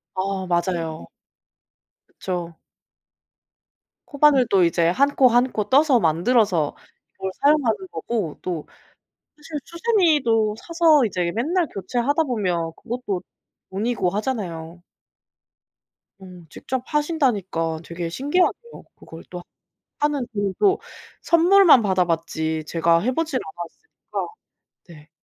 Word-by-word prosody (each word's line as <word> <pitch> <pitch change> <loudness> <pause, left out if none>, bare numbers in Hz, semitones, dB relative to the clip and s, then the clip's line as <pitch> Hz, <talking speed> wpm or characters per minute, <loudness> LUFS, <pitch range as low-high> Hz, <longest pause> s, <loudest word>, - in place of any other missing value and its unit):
아 190 0 -2
맞아요. 170 - -2 1.0
그쵸. 175 -2 -5 1.5
코바늘 285 -4 +3
또 190 -2 +4
이제 170 0 +2
1 280 +10 +2
코, 260 - +6
1 245 +2 +3
코 210 -1 -3
떠서 275 -2 +4
만들어서 175 - +2 0.4
이걸 190 0 -4
사용하는 290 - +2
거고 210 -10 -4
또 170 -4 -4 0.7
사실 300 0 -7
수세미도 305 - +2
사서 330 -5 +3
이제 180 -3 -2
맨날 325 +9 0
교체하다 250 +10 -1
보면 180 - -1
그것도 215 -6 -4 0.5
돈이고 200 -1 -1
하잖아요. 180 -7 -4 1.4
어 190 - -12 0.2
직접 255 - -5
하신다니까 210 - -1
되게 170 0 -5
신기하네요. 360 - -1
그걸 165 0 -13
또 180 -1 -8 0.6
하는 290 -3 0
일도 205 - +1 0.4
선물만 340 -4 +6
받아 190 -3 +1
봤지 160 -1 -2
제가 165 0 +2
해 250 +6 0
보진 310 -2 -1
않았으니까 175 - -8 0.6
네. 155 -1 -15
215 Hz, 230 characters per minute, -22 LUFS, 175-285 Hz, 1.5 s, 코